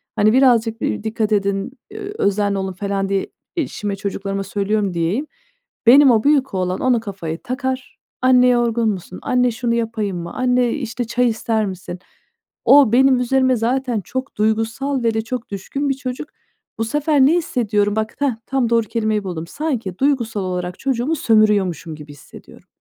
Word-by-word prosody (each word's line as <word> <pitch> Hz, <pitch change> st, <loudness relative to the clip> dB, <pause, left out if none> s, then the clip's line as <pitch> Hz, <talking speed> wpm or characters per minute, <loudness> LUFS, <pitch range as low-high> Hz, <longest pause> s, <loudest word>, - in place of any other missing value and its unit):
Hani, 215 Hz, +2 st, +3 dB
birazcık, 235 Hz, -4 st, +3 dB
eee, -, -, -2 dB
dikkat 220 Hz, -1 st, -1 dB
edin, 200 Hz, +2 st, 0 dB, 0.2 s
eee, 410 Hz, -1 st, -7 dB
özenli 200 Hz, 0 st, +1 dB
olun, 190 Hz, -1 st, -3 dB
falan, 195 Hz, 0 st, -2 dB
diye 195 Hz, -1 st, 0 dB, 0.3 s
eşime, 210 Hz, -10 st, -2 dB
çocuklarıma 195 Hz, 0 st, -3 dB
söylüyorum 200 Hz, 0 st, -1 dB
diyeyim. 175 Hz, -, -1 dB, 0.6 s
Benim 270 Hz, +1 st, +8 dB
o 220 Hz, -2 st, +3 dB
büyük 280 Hz, -4 st, +2 dB
oğlan 185 Hz, -1 st, -1 dB
onu 250 Hz, -3 st, +3 dB
kafaya 190 Hz, -7 st, -5 dB
takar, 260 Hz, 0 st, -4 dB, 0.2 s
"Anne, 250 Hz, -1 st, +5 dB
yorgun 235 Hz, -2 st, +2 dB
musun? 185 Hz, -2 st, -5 dB
Anne, 250 Hz, -1 st, +2 dB
şunu 235 Hz, +1 st, -1 dB
yapayım 220 Hz, -5 st, -2 dB
mı? 170 Hz, 0 st, -6 dB
Anne, 250 Hz, -1 st, +2 dB
eee, -, -, -3 dB
işte 245 Hz, -1 st, -3 dB
çay 245 Hz, +2 st, +1 dB
ister 220 Hz, -1 st, -1 dB
misin?" 185 Hz, -2 st, -6 dB, 0.7 s
O 280 Hz, -6 st, +7 dB
benim 260 Hz, 0 st, +5 dB
üzerime 260 Hz, +1 st, +2 dB
zaten 245 Hz, 0 st, -1 dB
çok 260 Hz, +8 st, -5 dB
duygusal 225 Hz, +5 st, 0 dB
ve 230 Hz, -1 st, +2 dB
de 220 Hz, -, +1 dB
çok 245 Hz, +1 st, -5 dB
düşkün 275 Hz, +9 st, -3 dB
bir -, -, +2 dB
çocuk. 265 Hz, +3 st, -6 dB, 0.5 s
Bu 225 Hz, -, +1 dB
sefer 295 Hz, +2 st, +1 dB
ne 280 Hz, +5 st, +6 dB
hissediyorum? 210 Hz, -, 0 dB
Bak, 220 Hz, 0 st, -2 dB
hah, 280 Hz, -5 st, +1 dB
tam 265 Hz, -3 st, 0 dB
doğru 230 Hz, -2 st, +2 dB
kelimeyi 215 Hz, -2 st, -1 dB
buldum. 170 Hz, -3 st, -5 dB
Sanki 235 Hz, -, -3 dB
duygusal 240 Hz, -7 st, 0 dB
olarak 180 Hz, -1 st, -4 dB
çocuğumu 265 Hz, +3 st, 0 dB
sömürüyormuşum 210 Hz, -, +2 dB
gibi 150 Hz, -1 st, -11 dB
hissediyorum. 145 Hz, -, -15 dB
225 Hz, 165 wpm, -20 LUFS, 200-255 Hz, 0.7 s, Benim